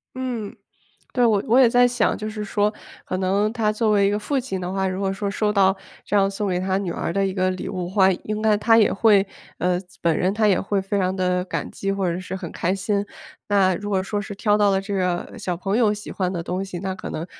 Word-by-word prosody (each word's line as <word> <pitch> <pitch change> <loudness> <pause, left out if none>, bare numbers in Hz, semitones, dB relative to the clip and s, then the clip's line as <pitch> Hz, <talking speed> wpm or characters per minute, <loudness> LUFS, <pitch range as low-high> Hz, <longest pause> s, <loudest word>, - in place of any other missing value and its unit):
嗯， 245 -5 -4 0.6
对。 245 -1 +3
我 210 -4 +3
我 245 +4 +5
也 245 -3 +7
在 245 +1 +5
想， 245 -3 +1
就 215 0 -4
是 215 -1 -5
说 210 +1 0 0.3
可 185 - -3
能 200 +3 +1
他 215 -3 +1
作 215 0 +1
为 200 -1 +4
一 - - +2
个 205 - 0
父 275 +5 -1
亲 215 -7 -4
的 180 +1 -3
话， 190 0 0
如 185 +1 -3
果 195 -1 0
说 200 +1 -3
收 210 +1 0
到 195 -2 +3 0.3
这 205 - -1
样 195 -1 +4
送 200 +1 -3
给 180 -1 0
他 190 +1 0
女 190 -4 -3
儿 - - -3
的 195 +1 +1
一 190 - -2
个 185 -1 +1
礼 185 - -5
物 180 -1 -3
的 - - -7
话， 190 -2 +5
应 215 +4 -4
该 215 -1 +4
他 225 +2 +4
也 215 - +4
会 200 -2 +4 0.3
呃， 180 0 +1 0.2
本 165 -2 +2
人 185 +2 +1
他 215 0 +2
也 195 - +3
会 195 0 -1
非 200 +1 -2
常 185 0 0
地 180 -1 0
感 - - -4
激， 195 0 -3
或 195 -3 0
者 175 - -3
是 185 +1 -6
很 185 -3 -6
开 180 +3 -1
心。 200 +1 -1 0.4
那 195 -3 +3
如 205 +3 -5
果 195 -2 +1
说 205 +2 -3
是 205 - -7
挑 210 0 +2
到 205 -1 +4
了 190 - +2
这 200 +1 -5
个 180 -2 -1
小 180 -2 -3
朋 195 +4 -1
友 215 -4 +3
喜 210 0 -8
欢 185 -2 -1
的 170 -3 -3
东 185 +3 -3
西， 185 -3 -6
那 190 0 -3
可 - - -7
能 160 - -4
195 Hz, 285 characters per minute, -23 LUFS, 185-210 Hz, 0.6 s, 也